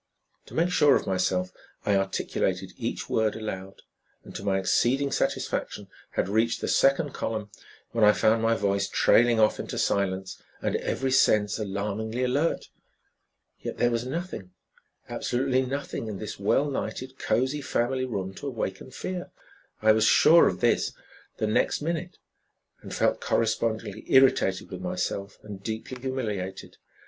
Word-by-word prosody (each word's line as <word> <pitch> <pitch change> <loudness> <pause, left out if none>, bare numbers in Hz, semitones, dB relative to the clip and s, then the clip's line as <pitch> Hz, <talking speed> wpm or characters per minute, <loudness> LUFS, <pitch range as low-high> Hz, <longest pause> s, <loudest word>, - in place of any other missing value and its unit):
To - - -11
make 170 +2 +2
sure 150 -5 +5
of - - 0
myself, 90 -1 0 0.3
I 100 - +3
articulated 95 0 -1
each - - -4
word 110 -1 +1
aloud, 95 -3 -6 0.4
and - - -12
to - - -6
my 100 -1 +1
exceeding 130 +8 +2
satisfaction - - -2 0.2
had - - 0
reached 110 +3 +1
the - - -3
second 140 +2 +3
column 110 -2 -3 0.4
when 115 -2 +1
I 105 - +8
found 110 +1 +2
my 115 0 +3
voice 100 -1 0
trailing 120 -1 +4
off 110 -1 +3
into - - -5
silence, 95 -1 -1 0.2
and - - -1
every 135 0 -2
sense 110 -5 +3
alarmingly 105 +4 -2
alert. 140 +6 0 0.9
Yet - - -6
there 120 - +2
was 115 0 0
nothing, 140 - -5 0.6
absolutely 130 +1 0
nothing 130 -3 -4
in 105 -2 -4
this 105 0 -6
well 135 +8 +2
lighted, 130 -1 -4
cozy 130 +4 0
family 130 0 0
room 95 -6 -4
to 145 - -6
awaken 115 -3 -4
fear. 180 +7 -5 0.5
I 110 - +7
was 110 0 +3
sure 165 +8 +7
of 90 - -2
this - - +2 0.4
the - - 0
next 110 - +1
minute, 170 +3 -3 0.6
and - - -10
felt - - +1
correspondingly 110 -2 -1
irritated 130 -8 +4
with - - -6
myself 100 0 -3
and 100 -2 -9
deeply 110 +4 -5
humiliated. 105 -8 -4
110 Hz, 150 wpm, -27 LUFS, 100-130 Hz, 0.9 s, I